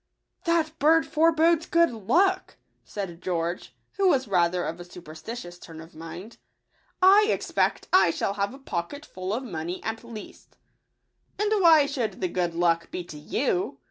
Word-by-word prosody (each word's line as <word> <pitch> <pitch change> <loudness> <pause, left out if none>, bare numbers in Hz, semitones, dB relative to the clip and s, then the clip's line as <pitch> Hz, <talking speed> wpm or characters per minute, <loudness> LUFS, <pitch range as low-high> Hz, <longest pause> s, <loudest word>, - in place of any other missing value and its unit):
" - - -41
That 335 -2 +1
bird 320 +2 +4
forebodes 325 +1 +3
good 335 -2 +3
luck," 370 - +1 0.3
said 185 -4 -7
George, 175 0 -3 0.2
who 395 -1 +3
was 270 -8 +2
rather 175 -2 +1
of 165 +2 -5
a - - -7
superstitious 175 +2 -9
turn 165 -2 -11
of 165 +1 -12
mind; 165 +7 -10 0.4
" - - -40 0.2
I 425 - +3
expect - - 0
I 370 - +6
shall 180 +4 -1
have 200 0 -2
a 265 - -11
poc 175 -11 -4
ketful 195 -11 -7
of 235 +5 -2
money 175 -5 -5
at 225 +1 -4
least!" 230 -3 -11 0.4
" - - -44
And 420 0 0
why 320 -4 +7
should 260 -6 -3
the 185 - -1
good 175 -1 -2
luck 170 -1 +1
be 180 - -5
to 155 -3 -11
you 180 - -1
200 Hz, 175 wpm, -26 LUFS, -, 0.4 s, why